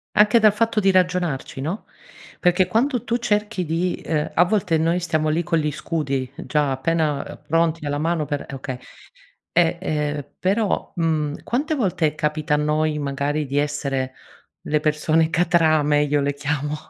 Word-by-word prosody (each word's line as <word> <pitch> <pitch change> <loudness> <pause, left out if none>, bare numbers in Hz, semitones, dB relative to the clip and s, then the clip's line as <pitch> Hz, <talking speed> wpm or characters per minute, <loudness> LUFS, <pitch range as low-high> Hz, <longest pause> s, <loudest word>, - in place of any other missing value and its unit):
Anche 210 +2 +6
dal 215 -2 +5
fatto 225 0 +1
di 195 -1 +4
ragionarci, 180 -7 0
no, 165 +10 -4 0.5
perché 180 0 +3
quando 240 +4 +1
tu 235 - 0
cerchi 210 -4 -1
di 170 +3 0
ehm, 150 -2 -2
a 175 - +5
volte 180 -4 +1
noi 165 +3 +1
stiamo 155 -3 0
lì 160 +3 +1
con 170 -1 0
gli 150 -1 0
scudi 140 -5 -3
già, 145 +1 0
appena 150 +1 0
ehm, - - -10
pronti 165 0 +1
alla 145 0 -1
mano 160 0 0
per 145 -1 -3
e - - -9
okay. 130 -1 -5 0.7
E, 170 0 +3
ehm, 150 -3 -2
però, 200 +2 0
mhmm, 155 -3 -1
quante 295 +6 -1
volte 180 - +1
capita 150 0 -1
a 150 - +4
noi, 150 0 0
magari, 145 +1 -1
di 140 +2 -2
essere 140 -3 -1 0.5
le 150 - 0
persone 155 +2 +1
catrame? 155 -4 +3
Io 145 0 +1
le 140 0 -1
chiamo 145 +1 -2
155 Hz, 165 wpm, -22 LUFS, 150-180 Hz, 0.7 s, Anche